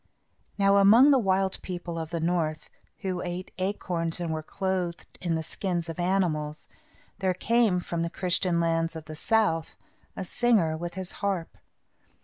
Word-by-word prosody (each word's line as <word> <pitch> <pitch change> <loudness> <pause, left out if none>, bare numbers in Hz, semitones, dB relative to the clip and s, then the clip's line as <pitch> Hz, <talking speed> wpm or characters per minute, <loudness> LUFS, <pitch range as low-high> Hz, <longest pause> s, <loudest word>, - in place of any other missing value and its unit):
Now 200 0 +4
among 225 +8 +7
the 270 - +5
wild 190 -2 +1
people 175 -2 -5
of 160 -1 -5
the 170 0 -2
north, 160 -2 -1 0.3
who 185 -3 -2
ate 180 +1 -5
acorns 175 -3 -1
and 170 -2 -2
were 155 - -2
clothed 185 0 -3
in 170 -2 0
the 160 - -2
skins 175 0 -3
of 165 - -6
animals, 170 -5 0 0.5
there 190 -2 +1
came, 225 -1 +2
from 170 -1 -3
the 170 - -1
Christian 180 -1 +1
lands 165 0 +1
of 160 -1 -7
the 155 +1 -8
south, 165 -3 +1 0.4
a 190 - -4
singer 200 -7 +2
with 175 +2 -5
his 185 -1 -4
harp. 195 -5 -2
175 Hz, 160 wpm, -27 LUFS, 165-195 Hz, 0.5 s, among